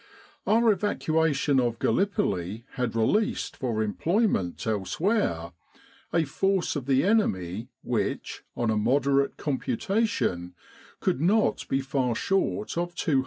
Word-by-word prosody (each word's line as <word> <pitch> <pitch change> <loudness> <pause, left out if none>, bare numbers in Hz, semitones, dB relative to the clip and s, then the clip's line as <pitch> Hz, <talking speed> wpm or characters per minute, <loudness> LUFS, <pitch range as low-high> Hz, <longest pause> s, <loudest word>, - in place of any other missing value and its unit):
Our 225 +1 +5
evacuation 160 -8 +1
of 120 -2 0
Gallipoli 110 - 0
had 125 -3 -2
released 205 - +1
for 115 -4 -1
employment 140 - 0
elsewhere 110 - 0 0.6
a 165 - +2
force 190 +6 0
of 140 -3 -4
the 135 -1 +3
enemy 110 - 0
which, - - -2
on 120 -2 +1
a 110 - +1
moderate 140 +5 +2
computation, 130 - -1 0.5
could 130 - 0
not 205 +6 +2
be 135 - 0
far 130 -3 -1
short 195 - 0
of 175 0 -3
250,000. 145 -6 +1
135 Hz, 120 wpm, -27 LUFS, -, 0.6 s, Our